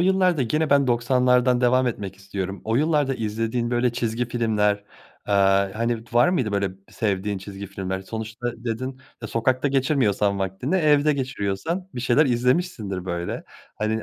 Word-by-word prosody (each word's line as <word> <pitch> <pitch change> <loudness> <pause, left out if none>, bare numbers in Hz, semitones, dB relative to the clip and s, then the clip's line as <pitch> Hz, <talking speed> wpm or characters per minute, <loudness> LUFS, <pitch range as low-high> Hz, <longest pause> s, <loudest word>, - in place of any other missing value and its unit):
yıllarda 185 -4 +3
gene 155 +6 0
ben 140 -1 +4
doksanlardan 125 +1 +3
devam 125 +1 +3
etmek 100 -5 -4
istiyorum. 95 0 -5
O 110 +1 0
yıllarda 145 -2 +2
izlediğin 115 +1 -2
böyle 120 0 +1
çizgi 120 0 -2
filmler, 110 -4 +2 0.5
eee, - - +1 0.4
hani, 115 0 -2
d - - -21
var 120 +8 +5
mıydı 130 - 0
böyle 100 -1 0 0.2
sevdiğin 100 -1 -1
çizgi 100 +1 -8
filmler? 95 0 -4
Sonuçta 110 +4 -6
dedin, 130 +3 -4 0.2
e, - - -3
sokakta 130 +5 +1
geçirmiyorsan 125 -8 +1
vaktini 95 - -1
evde 150 -3 +4
geçiriyorsan 135 - -3
bir 125 - -4
şeyler 130 +5 +3
izlemişsindir 120 - 0
böyle. 85 -1 -4 0.3
Hani, 110 +1 -1
120 Hz, 150 wpm, -24 LUFS, 105-130 Hz, 0.5 s, var